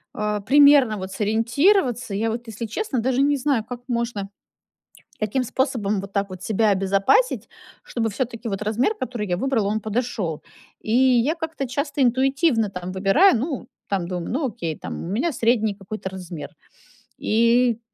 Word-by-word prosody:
э, 210 0 -1
примерно 280 -4 +6
вот 190 0 -6
сориентироваться. 235 - +1
Я 225 +2 0
вот, 235 +1 -5
если 225 +1 -5
честно, 260 - -2
даже 260 +3 +1
не 285 0 +3
знаю, 265 -4 0
как 245 +2 -8
можно, 235 -5 -2 0.9
каким 215 +5 0
способом 235 -6 -1
вот 195 +1 -9
так 200 -1 -1
вот 185 -1 -9
себя 215 0 +2
обезопасить, 195 - +2 0.3
чтобы 225 -2 -2
всё-таки 235 +1 -4
вот 195 0 -3
размер, 225 - +1
который 245 - -4
я 175 - 0
выбрала, 230 -3 0
он 215 +1 -1
подошел. 215 -8 -3 0.4
И 220 - -4
я 260 +3 +4
как-то 320 -4 -4
часто 285 +2 -1
интуитивно 260 - +2
там 180 -1 -6
выбираю. 205 - +4
Ну, 270 -1 -4 0.2
там 190 -4 -1
думаю: 180 -2 -4
"Ну, 275 +2 0
окей 165 -8 -5
там, - - -6
у 170 - -6
меня 255 - 0
средний 225 -4 +1
какой-то 195 0 -7
размер". 170 -6 -8 0.7
И 235 +1 +3
225 Hz, 160 wpm, -23 LUFS, 200-260 Hz, 0.9 s, примерно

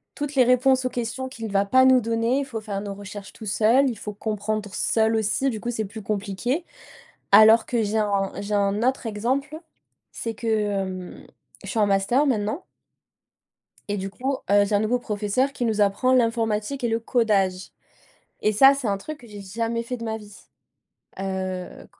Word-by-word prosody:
Toutes 290 -1 -4
les 260 - +6
réponses 255 +1 +3
aux - - +1
questions 245 +2 -4
qu'il 225 -5 -7
va 200 0 +2
pas 260 +6 +5
nous 260 -1 +6
donner. 230 +4 0
Faut 230 -5 -6
faire 205 -2 -4
nos 200 -1 -5
recherches 200 -1 -9
tous 220 - -9
seuls, 230 +7 +3
il 235 - -5
faut 210 0 -6
comprendre 210 0 -3
seul 220 +2 +1
aussi, 220 +5 +1
du 220 -4 -4
coup 240 - -2
c'est 220 -2 -2
plus 215 +2 -9
compliqué. 215 - -2 0.7
Alors 220 +2 +7
que 235 -3 0
j'ai 210 +1 -1
un 200 -2 0
j'ai 205 +1 -4
un 200 +1 +1
autre 260 0 0
exemple. 265 +8 -2 0.5
C'est 230 - -4
que, 230 - -6
hem, 195 -4 -2 0.4
je - - -7
suis 230 - -1
en 210 - +5
master 200 +8 +2
maintenant 230 - -1 1.2
et 205 - -1
du 195 0 -4
coup, 265 +5 -3
heu, 205 0 +5
j'ai 205 - -1
un 205 - +3
nouveau 225 +3 +1
professeur 220 +4 -1
qui 255 - -3
nous 220 -2 0
apprend 205 +6 +2
l'informatique 230 +1 +1
et - - +2
le 225 0 +1
codage 200 -6 +1 0.7
et 215 - +2
ça 270 +6 +7
c'est 275 -4 -3
un 200 -1 0
truc 300 +9 -8
que 240 - -15
j'ai 205 -2 -9
jamais 230 +4 -2
fait 250 +2 -5
de 230 - -8
ma 220 -1 -3
vie. 210 -2 -13 0.8
Heu. 190 -1 -4
220 Hz, 190 wpm, -24 LUFS, 205-250 Hz, 1.2 s, Alors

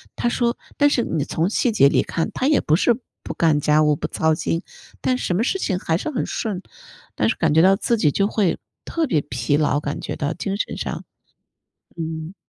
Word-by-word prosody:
他 240 - 0
说 235 0 0 0.2
但 290 0 +5
是 245 -5 +1
你 155 -4 -1
从 165 +4 0
细 235 +2 +1
节 140 -9 +6
里 - - +3
看， 165 - -2
他 265 - -1
也 300 - +4
不 155 - +2
是 235 +6 +3 0.2
不 - - -6
干 155 -3 +3
家 150 +1 +3
务 150 -1 +3
不 - - -3
操 160 0 +1
心， 165 +2 -2 0.4
但 255 -1 +1
什 180 - -1
么 220 - +1
事 385 +9 0
情 185 - 0
还 165 -3 0
是 310 - -4
很 265 - -2
顺， 205 -5 -3 0.5
但 - - +1
是 - - 0
感 160 -3 +1
觉 160 - +6
到 190 +2 +6
自 235 +3 0
己 155 -8 +3
就 200 +6 +1
会 205 -5 +1 0.3
特 330 -1 -1
别 165 - +1
疲 125 +4 -1
劳， 145 -1 +2
感 145 - -4
觉 - - -4
到 150 +2 -2
精 195 +2 -3
神 - - -3
上， - - -4 0.9
嗯。 160 +2 -5
175 Hz, 240 characters per minute, -22 LUFS, 155-230 Hz, 0.9 s, 节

